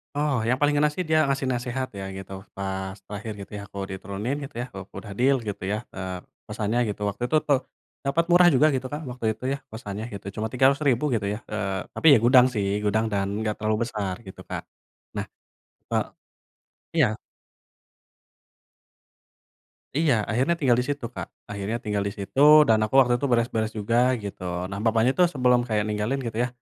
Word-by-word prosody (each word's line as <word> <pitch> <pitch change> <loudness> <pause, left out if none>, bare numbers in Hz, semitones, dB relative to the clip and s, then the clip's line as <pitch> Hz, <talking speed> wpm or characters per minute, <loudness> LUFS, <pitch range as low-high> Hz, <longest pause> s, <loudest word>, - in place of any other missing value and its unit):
Oh, 145 -3 +1
yang 125 - +3
paling 145 0 +3
ngena 150 +1 +4
sih, 185 - -2
dia 155 -2 +3
ngasih 135 -1 0
nasehat 125 +1 -2
ya 95 - -4
gitu, 95 0 -8 0.2
pas 95 0 -4
terakhir 105 +2 -6
gitu - - -15
ya, - - -6
aku 100 - -12
diturunin 100 +7 -3
gitu 135 - -13
ya, - - -3
u - - -4 0.2
udah 105 - -7
deal 135 +2 +4
gitu 105 -3 -5
ya, 105 +2 0 0.2
eee, 95 -1 -4 0.3
kosannya 110 +3 -1
gitu, 105 0 -5
waktu 100 - -6
itu 155 - +3
tuh, 140 -3 +4 0.5
dapat 145 +5 +2
murah 175 0 +7
juga 145 +4 +5
gitu, 130 0 -2
Kak, 150 +4 -5
waktu 125 -2 -6
itu - - -17
ya, - - -2
kosannya 105 -1 -6
gitu, 100 - -8
cuma 110 - 0
Rp300.000 135 +2 +3
gitu 105 -3 -1
ya. 105 - -5
Eee, 95 -3 -2
tapi - - 0
ya - - +6
gudang 125 +1 +7
sih, 100 -2 0
gudang 110 +2 +2
dan 100 -1 0 0.2
enggak 105 -1 0
terlalu 110 +1 +1
besar 105 -5 -3
gitu, 95 - -10
Kak. - - -4 0.5
Nah, - - -2 0.7
eee - - +2 0.9
iya. 160 -5 +6 2.9
Iya, 155 -4 +3 0.2
akhirnya 130 +9 +2
tinggal 125 -5 +3
di - - +1
situ, 145 -3 -2
Kak, - - -5 0.2
akhirnya 100 +3 -2
tinggal 105 -2 -1
di - - -2
situ 100 +6 -4 0.3
dan 110 - +5
aku 110 - -3
waktu 125 -2 +5
itu 140 +3 -1
beres-beres 115 -2 +1
juga 115 +3 0 0.3
gitu. 100 -2 -7 0.3
Nah, 95 - -5
bapaknya 115 +2 +3
tuh 180 - +7
sebelum 125 -2 +4
kayak 105 -2 +1
ninggalin 105 +6 -1
gitu 110 -1 -5
ya, - - +1
115 Hz, 185 wpm, -25 LUFS, 105-135 Hz, 2.9 s, murah